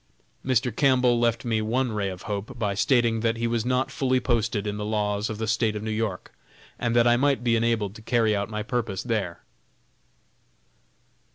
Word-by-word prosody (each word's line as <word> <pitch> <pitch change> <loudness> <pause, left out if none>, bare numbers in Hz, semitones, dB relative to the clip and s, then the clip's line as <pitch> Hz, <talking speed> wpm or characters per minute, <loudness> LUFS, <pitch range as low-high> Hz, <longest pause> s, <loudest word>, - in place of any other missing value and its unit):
Mr. 125 -3 +1
Campbell 125 -3 +3
left 115 0 +1
me 110 -2 0
one 120 +3 0
ray 105 -2 -1
of 90 -1 -8
hope 105 +5 -5
by 105 -3 -1
stating 120 +1 +2
that 115 0 0
he 115 - -2
was 115 -1 0
not 125 +2 0
fully 130 -1 +1
posted 115 -4 0
in 105 0 -3
the 105 - -4
laws 105 0 -1
of 110 - -4
the 110 - -2
State 110 -1 +1
of 105 - -4
New 110 - -3
York, 110 -4 -3 0.5
and 120 -1 0
that 120 0 +5
I 120 0 +5
might 140 -1 +1
be 120 -1 +3
enabled 115 -3 0
to 110 - -12
carry 110 -2 +2
out 100 +2 -2
my 105 -1 -3
purpose 115 -5 -2
there. 105 -8 -3
115 Hz, 195 wpm, -25 LUFS, 105-120 Hz, 0.5 s, that